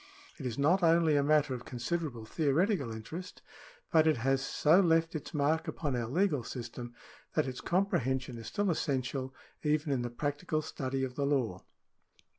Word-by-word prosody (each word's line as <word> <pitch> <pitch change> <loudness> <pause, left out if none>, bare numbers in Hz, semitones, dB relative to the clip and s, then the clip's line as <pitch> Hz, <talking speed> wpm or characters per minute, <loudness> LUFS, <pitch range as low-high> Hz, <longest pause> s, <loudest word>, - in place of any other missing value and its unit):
It 135 - -3
is 115 - -4
not 165 +7 +3
only 165 -2 +4
a 145 - +4
matter 150 -1 +3
of 125 -1 -5
considerable 125 -1 -3
theoretical 155 - +1
interest, 135 +12 -8 0.5
but 160 -1 +5
it 155 - +3
has 135 +3 +1
so 155 +5 +4
left 165 -3 +3
its 155 -2 -5
mark 150 +2 +1
upon 145 -5 -2
our 120 -2 -1
legal 150 - +1
system, 120 0 -7 0.4
that - - +2
its 130 -1 -5
comprehension 130 -9 0
is 115 - -8
still 205 -3 0
essential 130 -3 -1 0.3
even 150 -1 +1
in 130 - 0
the 120 - -2
practical 145 +5 -2
study 135 -1 -3
of 130 -1 -3
the 140 +2 -1
law. 120 -10 0
140 Hz, 170 wpm, -31 LUFS, 125-160 Hz, 0.5 s, but